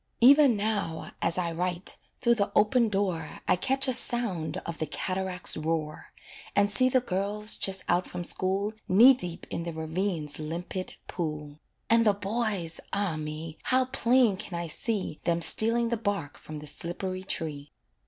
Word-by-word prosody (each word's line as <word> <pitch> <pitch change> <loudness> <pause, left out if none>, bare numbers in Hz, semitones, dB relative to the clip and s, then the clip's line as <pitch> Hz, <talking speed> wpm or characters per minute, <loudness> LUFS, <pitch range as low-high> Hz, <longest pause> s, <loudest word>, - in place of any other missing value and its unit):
Even 275 -1 +7
now, 205 -6 -2
as 170 - +1
I 175 -2 -1
write, 180 +2 -3 0.2
through 235 -1 +4
the 205 -4 0
open 230 +2 +4
door 185 -6 -2
I - - +4
catch 270 +9 +1
a 260 - +2
sound 200 -11 +2
of 170 - -6
the 155 - -2
cataract's 185 +3 +1
roar, 155 -1 -3 0.4
And 200 0 +3
see 255 +5 +5
the 255 0 +3
girls 205 0 -1
just 190 -1 -1
out 180 +1 +1
from 180 0 -5
school 195 +4 -1 0.2
Knee 235 +8 +8
deep 180 -9 -5
in - - -2
the 170 0 -4
ravine's 160 -1 -3
limpid 170 +4 -5
pool; 150 -3 -5 0.3
And 230 0 +4
the 210 -3 +3
boys, 200 -5 -2
ah, 200 -5 -1
me! 155 +1 -6
how 255 0 +3
plain 250 -4 +2
can 180 -2 -5
I 170 - -3
see 185 +1 -3
Them 170 0 +1
stealing 230 +6 +2
the 235 - 0
bark 200 -9 -3
from 155 - -9
the 150 - -9
slippery 185 +5 -3
tree. 150 -6 -3
185 Hz, 165 wpm, -28 LUFS, 165-220 Hz, 0.4 s, Knee